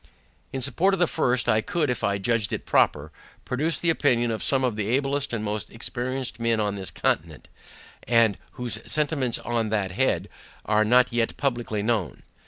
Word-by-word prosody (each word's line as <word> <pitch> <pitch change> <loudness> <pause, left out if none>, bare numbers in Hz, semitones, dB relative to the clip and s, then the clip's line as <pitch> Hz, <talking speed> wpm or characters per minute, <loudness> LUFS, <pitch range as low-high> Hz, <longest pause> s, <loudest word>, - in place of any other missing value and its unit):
In 135 - -3
support 175 +9 +2
of - - -8
the 175 - +5
first, 125 -6 +1
I 110 - +3
could, 150 +7 -1
if 125 - -4
I 100 0 +1
judged 110 +1 0
it - - -4
proper, 75 +1 +2 0.3
produce 155 +6 0
the 170 - +2
opinion 120 -7 +2
of 110 - -3
some 135 -1 +2
of 125 -4 0
the 105 -1 -2
ablest 140 +3 0
and 115 -2 -2
most 105 0 -3
experienced 125 +1 -3
men 115 -1 +1
on 105 -1 0
this 95 -2 -5
continent; 75 -1 -2 0.6
and 115 -3 +3
whose 120 -3 -3
sentiments, 145 -5 +1
on 115 -2 -2
that 100 -3 -1
head, 130 +8 0 0.4
are 110 0 +3
not 125 +3 +4
yet 115 -1 0
publicly 120 -6 -1
known. 110 -6 -1
120 Hz, 185 wpm, -25 LUFS, 105-130 Hz, 0.6 s, the